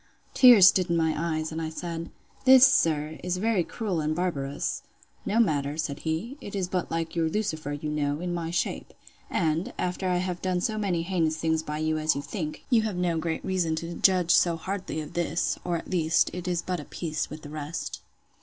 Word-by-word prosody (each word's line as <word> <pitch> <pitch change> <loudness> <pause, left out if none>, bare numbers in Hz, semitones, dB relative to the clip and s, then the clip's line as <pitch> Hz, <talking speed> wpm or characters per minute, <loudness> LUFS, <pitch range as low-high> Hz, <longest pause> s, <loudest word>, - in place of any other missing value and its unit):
Tears 240 -7 +8
stood 185 -1 +5
in 170 - +2
my 160 -1 +2
eyes, 155 -1 -2
and 160 +1 -4
I 160 - -2
said, 165 0 -5 0.4
This, 260 0 +9
sir, 160 - +2
is 180 0 -1
very 210 -2 +1
cruel 190 -4 -3
and 155 +1 -1
barbarous.—No 175 +6 -3
matter, 145 -8 +1
said 150 -2 -3
he; 175 - -3
it 205 - -7
is 190 -3 -1
but 180 -1 -2
like 165 0 -3
your 165 -1 +1
Lucifer, 160 -7 -2
you 145 +1 -5
know, 150 -1 -1
in 175 0 -3
my 170 -1 -3
shape! 175 - -3 0.3
And, 165 +1 0
after 180 +1 -2
I 180 - +2
have 180 -1 -3
done 185 -1 0
so 215 +4 -1
many 180 -5 0
heinous 165 -3 0
things 160 -1 0
by 150 -1 -5
you 155 0 0
as 155 0 +2
you 140 - -3
think, 155 -6 -5
you 235 -2 +5
have 215 -3 -2
no 175 -2 0
great 160 0 -3
reason 175 -4 0
to 165 +2 -5
judge 180 -1 +3
so 170 -2 +4
hardly 185 -2 -4
of 150 - -9
this; 175 0 -1
or, 175 -1 -1
at - - -8
least, 165 -2 +2
it 180 0 -5
is 175 -1 -1
but 180 -1 -2
of 150 - -9
a - - -29
piece 155 -3 -3
with 155 +1 -9
the 145 - -8
rest. 155 +2 -5
170 Hz, 215 wpm, -27 LUFS, 155-185 Hz, 0.4 s, This